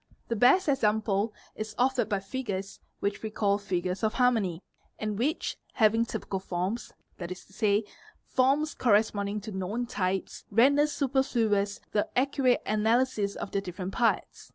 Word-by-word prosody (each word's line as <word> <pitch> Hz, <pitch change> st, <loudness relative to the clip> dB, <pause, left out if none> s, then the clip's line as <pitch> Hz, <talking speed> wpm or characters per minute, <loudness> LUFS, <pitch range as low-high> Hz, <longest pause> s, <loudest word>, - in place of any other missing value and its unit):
The 230 Hz, -, 0 dB
best 255 Hz, -, +5 dB
example 215 Hz, -5 st, +1 dB, 0.2 s
is 215 Hz, 0 st, -6 dB
offered 250 Hz, -3 st, +2 dB
by 200 Hz, -2 st, 0 dB
figures 200 Hz, -3 st, -4 dB, 0.2 s
which 200 Hz, 0 st, -1 dB
we 220 Hz, -, -3 dB
call 205 Hz, -1 st, +1 dB
_ -, -, -17 dB
"figures 185 Hz, -2 st, -2 dB
of 220 Hz, -1 st, 0 dB
harmony," 220 Hz, -9 st, +2 dB, 0.3 s
and 215 Hz, -1 st, -3 dB
which, 300 Hz, +8 st, -1 dB, 0.2 s
having 225 Hz, 0 st, +3 dB
typical 195 Hz, -4 st, -4 dB
forms, 185 Hz, +5 st, -3 dB, 0.3 s
that 175 Hz, -2 st, -5 dB
is 185 Hz, -, -8 dB
to -, -, -22 dB
say, 205 Hz, +2 st, +2 dB, 0.4 s
forms 280 Hz, +4 st, +2 dB
corresponding 210 Hz, -2 st, +1 dB
to 215 Hz, +2 st, -7 dB
known 200 Hz, +5 st, -2 dB
types, 190 Hz, -4 st, -2 dB
render 280 Hz, +7 st, +5 dB
superfluous 235 Hz, -8 st, 0 dB
the 205 Hz, -, 0 dB
accurate 265 Hz, -1 st, +2 dB
analysis 215 Hz, -1 st, +1 dB
of -, -, -6 dB
their 200 Hz, -, 0 dB
different 185 Hz, 0 st, -6 dB
parts. 235 Hz, -1 st, 0 dB
215 Hz, 155 wpm, -28 LUFS, 200-245 Hz, 0.4 s, best